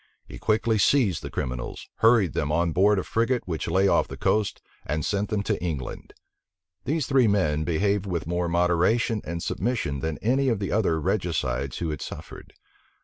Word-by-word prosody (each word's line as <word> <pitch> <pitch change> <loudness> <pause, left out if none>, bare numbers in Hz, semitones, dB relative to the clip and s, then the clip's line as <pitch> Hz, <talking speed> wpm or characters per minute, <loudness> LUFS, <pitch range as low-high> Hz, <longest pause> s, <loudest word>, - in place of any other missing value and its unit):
He - - -10
quickly 110 0 +1
seized 100 - +3
the 70 - -6
criminals, 65 -2 -5
hurried 110 -7 +4
them 75 -1 -1
on 85 +2 +1
board 100 +5 +4
a 95 - 0
frigate 115 +2 0
which 80 -3 -3
lay 95 +4 +3
off - - +3
the - - -8
coast, 105 -2 0 0.2
and 75 0 -2
sent 100 +1 -1
them 105 -2 -1
to - - -2
England. 75 -7 -5 0.7
These 155 -1 0
three 130 -4 +3
men 80 -7 +1
behaved 100 +4 0
with 85 -4 -2
more 85 +1 -1
moderation 90 +6 +2
and 85 +1 -5
submission 100 - -1
than 80 +1 -3
any 130 +4 +1
of 115 - +1
the 100 -1 -3
other 95 -7 +1
regicides 70 -5 -1
who 85 -2 -2
had 75 - -5
suffered. - - -9
90 Hz, 180 wpm, -25 LUFS, 80-110 Hz, 0.7 s, hurried